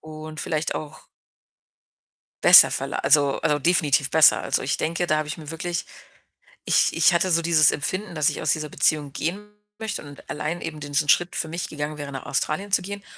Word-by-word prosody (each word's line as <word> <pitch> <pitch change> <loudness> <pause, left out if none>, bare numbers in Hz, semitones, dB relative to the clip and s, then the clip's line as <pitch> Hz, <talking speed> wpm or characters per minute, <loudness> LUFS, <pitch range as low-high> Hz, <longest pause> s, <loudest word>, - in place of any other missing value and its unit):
und 155 0 -9
vielleicht 155 -1 -3
auch 155 0 -7 1.4
besser - - +9
verla - - -3
also, 145 -2 +2
äh, 150 -1 0
definitiv 150 -4 +1
besser. 160 -1 +5
Also, - - -1
ich 135 - -1
denke, 170 +2 -2
da 155 -2 +1
habe 155 -1 -4
ich 150 - -5
mir 155 -2 -9
wirklich 170 +1 -4 0.8
ich - - +2
ich 165 +1 +4
hatte 175 +2 +1
so 170 0 +3
dieses 160 -2 +4
Empfinden, 185 +7 -4
dass 155 -3 +1
ich - - -6
aus 150 - +1
dieser 155 0 -2
Beziehung 145 -2 0
gehen 200 +8 -5 0.3
möchte 220 -6 -5
und 145 -1 -14
allein 165 +3 -4
eben 160 -1 -6
diesen 145 +1 -1
Schritt 175 +3 +2
für - - -2
mich 165 +2 -5
gegangen 150 0 -5
wäre, 145 -1 -7
nach 135 -1 -8
Australien 195 +7 -2
zu 190 - +3
gehen 200 +2 -8
155 Hz, 195 wpm, -23 LUFS, 150-170 Hz, 1.4 s, besser